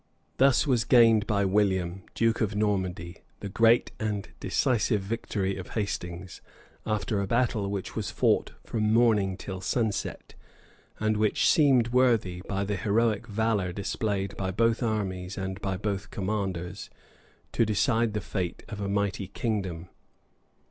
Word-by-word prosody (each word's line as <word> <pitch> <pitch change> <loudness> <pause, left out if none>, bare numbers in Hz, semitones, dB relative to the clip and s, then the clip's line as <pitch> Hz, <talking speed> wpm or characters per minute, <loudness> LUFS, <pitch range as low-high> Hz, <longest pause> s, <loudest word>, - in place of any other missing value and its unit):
Thus 135 -2 +4
was 125 -5 +2
gained 115 -3 +5
by 100 -3 +1
William, 95 -2 +1
duke 115 0 +1
of 105 -1 0
Normandy, 95 -5 -1 0.2
the 100 - -6
great 115 +4 +3
and 105 -2 -2
decisive 110 -3 +1
victory 100 -2 -2
of 95 - -8
Hastings, 90 -3 -4 0.5
after 105 -1 0
a 100 - -2
battle 115 -3 +1
which 100 -2 -4
was - - -2
fought - - +1
from 110 -1 -1
morning 110 -5 +3
till 95 -2 -6
sunset, 110 0 -2 0.7
and 110 0 +1
which 105 0 +2
seemed 130 -6 +4
worthy, 115 -8 +2
by 100 0 -1
the 100 0 -2
heroic 110 +3 +1
valor 105 -4 0
displayed 100 +1 -2
by 95 -1 -2
both 115 +5 +1
armies 100 -5 -2
and 95 0 -4
by 95 -1 -2
both 100 0 -3
commanders, 95 -2 -3 0.6
to - - +2
decide 110 +1 +1
the 105 - -1
fate 90 -3 -4
of 105 -3 -6
a 100 - -2
mighty 100 -1 -1
kingdom. 95 -5 -3
105 Hz, 140 wpm, -27 LUFS, 95-115 Hz, 0.7 s, gained